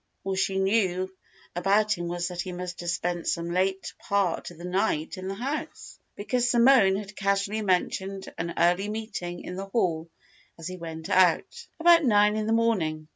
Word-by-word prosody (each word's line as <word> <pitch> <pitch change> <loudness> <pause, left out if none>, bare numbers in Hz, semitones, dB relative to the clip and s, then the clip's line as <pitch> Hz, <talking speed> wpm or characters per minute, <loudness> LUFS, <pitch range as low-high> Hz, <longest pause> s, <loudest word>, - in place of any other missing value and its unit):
All 195 - -2
she 190 0 0
knew 190 -2 +1 0.4
about 205 +4 +2
him 175 0 -5
was 175 +1 -2
that 175 -1 -4
he 185 - -5
must 180 0 -6
have 175 - -4
spent 175 0 -2
some 170 0 -1
late 190 +2 -1
part 200 -4 -1
of 175 - -14
the 170 - -9
night 180 -4 -1
in 185 0 -7
the 195 - -3
house, 270 +8 -5 0.2
because 245 +3 0
Simone 235 -5 +5
had 200 0 -6
casually 200 +2 0
mentioned 190 0 -1
an 170 0 -3
early 180 +4 +2
meeting 210 -5 -5
in 180 - -7
the 195 +1 -5
hall 170 -6 -1 0.5
as 165 0 -7
he 185 0 -6
went 160 -2 -7
out, 190 - +2
about 335 0 +6
nine 210 -4 +4
in 215 0 -2
the - - 0
morning. 175 -10 0
190 Hz, 180 wpm, -26 LUFS, 175-210 Hz, 0.5 s, about